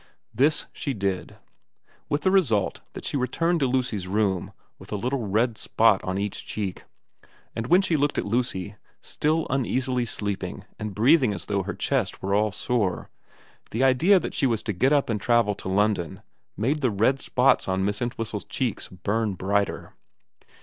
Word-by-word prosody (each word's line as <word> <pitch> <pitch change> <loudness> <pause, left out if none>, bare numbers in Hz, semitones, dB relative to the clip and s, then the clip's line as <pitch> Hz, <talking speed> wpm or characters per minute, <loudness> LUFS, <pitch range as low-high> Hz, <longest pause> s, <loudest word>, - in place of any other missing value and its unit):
This 145 +7 +3
she 140 - -3
did, 95 -2 -2 0.7
with 145 - 0
the 185 - +2
result 120 - +2
that - - -8
she - - -3
returned 165 +7 +1
to 135 - +2
Lucy's 125 -7 -1
room 95 -2 0 0.3
with - - -13
a - - -1
little 120 +2 -2
red 110 +3 +1
spot 110 -3 +3
on 95 +1 -2
each 100 0 -3
cheek; 100 -4 -5 0.7
and 115 +1 -3
when 180 +3 +5
she 175 -4 +1
looked 145 -1 +1
at - - 0
Lucy, 105 -3 -2 0.2
still 155 +2 0
uneasily 130 -1 0
sleeping 100 -3 -4
and 105 -3 -5
breathing 125 -1 +4
as 85 - -7
though 100 -1 0
her 105 +2 -5
chest 130 -8 -1
were 100 +1 0
all 105 +1 +2
sore, 105 -3 -1 0.6
the 115 +4 -1
idea 160 +10 +5
that - - -5
she 135 - +1
was 115 -4 -1
to 105 - -2
get 130 +10 +2
up 145 -2 +3
and 110 -3 -2
travel 120 -3 +3
to 95 - -7
London 100 -4 0 0.3
made 135 - 0
the 130 - +3
red 115 +6 +2
spots 130 +2 +2
on 95 0 0
Miss 105 +2 -2
Entwhistle's 115 -3 -3
cheeks 125 -6 -2
burn 100 +3 -2
brighter. 100 +2 -1
110 Hz, 175 wpm, -25 LUFS, 100-130 Hz, 0.7 s, when